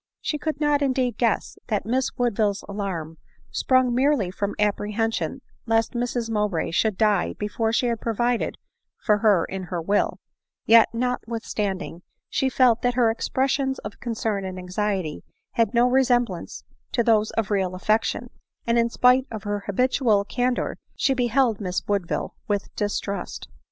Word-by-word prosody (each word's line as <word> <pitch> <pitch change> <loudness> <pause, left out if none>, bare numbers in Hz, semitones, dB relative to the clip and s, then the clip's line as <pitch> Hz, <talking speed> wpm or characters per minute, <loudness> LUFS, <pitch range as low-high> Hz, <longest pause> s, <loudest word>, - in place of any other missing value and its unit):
She 300 - -2
could 310 -2 -3
not 295 -1 +2
indeed 260 -4 0
guess 230 -3 0
that 210 -4 -1
Miss 255 +4 +1
Woodville's 215 -4 +1
alarm 185 -6 -4 0.3
sprung 255 -2 +2
merely 255 -7 +2
from 200 +1 -3
apprehension 210 +2 -1 0.3
lest 225 +1 +2
Mrs 240 -1 -1
Mowbray 210 -8 -1
should 210 +3 +1
die 210 -4 +2
before 220 +2 -1
she 240 - +1
had 235 -2 -1
provided 240 +1 0 0.4
for 210 -2 +2
her 205 -6 +4
in 190 -1 -5
her 175 -1 -3
will; 200 +5 0 0.5
yet, 225 0 +7
notwithstanding," 225 -7 -3 0.3
she 265 - +1
felt 250 -3 +4
that 245 0 +1
her 235 -3 +4
expres 260 +3 0
sions 265 -1 0
of 210 - -7
concern 220 -4 -2
and 185 -1 -5
anxiety 185 -3 -2 0.3
had 230 -2 +1
no 240 +1 +5
resemblance 245 -7 +1 0.3
to 235 - +2
those 220 -2 +3
of 220 -2 0
real 190 -3 0
affection; 220 +5 0 0.3
and 235 0 +2
in 235 0 +2
spite 250 +2 +4
of 215 -3 -6
her 205 0 -2
habitual 220 -1 +2
can 250 +3 0
dor, - - -3 0.2
she 270 - +2
beheld 245 -3 +1
Miss 180 -2 -3
Woodville 200 -4 -1
with 205 -2 -2
distrust. 205 -1 -3
225 Hz, 155 wpm, -24 LUFS, 205-245 Hz, 0.5 s, yet